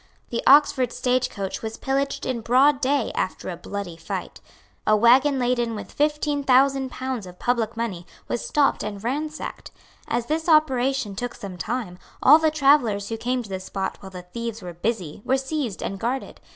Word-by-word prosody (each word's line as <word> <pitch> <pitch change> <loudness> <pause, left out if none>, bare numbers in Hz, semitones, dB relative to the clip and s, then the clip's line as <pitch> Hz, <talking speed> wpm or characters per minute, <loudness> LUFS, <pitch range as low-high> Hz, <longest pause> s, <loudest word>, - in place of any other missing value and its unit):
The 235 - -1
Oxford 270 -3 +5
stage 255 0 0
coach 195 -1 -5
was 225 0 -5
pillaged 275 +1 -1
in 250 -3 -2
broad 265 +5 +4
day 275 -2 +1
after 185 - -3
a 180 - -4
bloody 200 -1 -6
fight. 165 0 -6 0.5
A 215 - +6
waggon 260 +5 +5
laden 240 -2 0
with 210 - -8
fifteen 295 -1 0
thousand 270 0 +3
pounds 255 -6 -4
of 180 0 -12
public 235 -1 -1
money 195 -7 -4 0.2
was 240 - -2
stopped 290 -2 +2
and 205 -1 -5
ransacked. 300 +6 -4 0.4
As 235 0 -1
this 320 +5 -1
operation 265 -8 +2
took 245 +4 -4
some 195 -3 -8
time, 180 0 -4 0.2
all 300 +4 +8
the 315 -1 +3
travellers 275 -9 +3
who 225 - -2
came 250 +2 -1
to 210 - -12
the 190 -1 -3
spot 190 0 -4
while 195 - -10
the 180 -1 -9
thieves 230 +3 -6
were 175 -1 -6
busy 180 -2 -3
were 265 - +2
seized 265 -6 -3
and 195 - -4
guarded. 245 +5 -3
245 Hz, 180 wpm, -24 LUFS, 205-275 Hz, 0.5 s, all